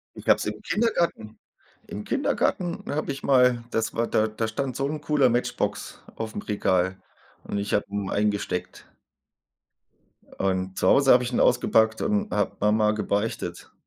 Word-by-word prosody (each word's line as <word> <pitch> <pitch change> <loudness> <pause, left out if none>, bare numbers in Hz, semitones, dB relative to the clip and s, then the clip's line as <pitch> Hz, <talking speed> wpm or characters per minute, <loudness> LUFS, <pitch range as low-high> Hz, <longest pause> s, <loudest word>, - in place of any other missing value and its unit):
Ich - - -11
habe - - +7
es - - -4
im - - -4
Kindergarten 170 - -1 0.5
im - - -7
Kindergarten 175 -2 -1
habe 145 0 -2
ich 135 -1 -7
mal 125 -3 +4
das 115 +1 -1
war 115 +1 0
da 110 - +2
da 110 +1 -3
stand 130 +3 -3
so 135 +1 -1
'n 150 +1 -4
cooler 145 -3 +3
Matchbox 120 +1 -2
aufm 110 -1 -5
Regal 95 -2 0 0.4
und - - -4
ich 100 0 -3
habe 105 - +2
ihn 100 -1 -3
eingesteckt. 100 -3 -2 1.5
Und 95 0 -1
zu - - +2
Hause 135 -1 +6
habe 125 - +5
ich 125 - -4
ihn - - +1
ausgepackt 110 0 +3
und 210 -1 0
habe 105 -2 0
Mama 105 +1 +3
gebeichtet 105 0 -3
110 Hz, 160 wpm, -25 LUFS, 105-135 Hz, 1.5 s, habe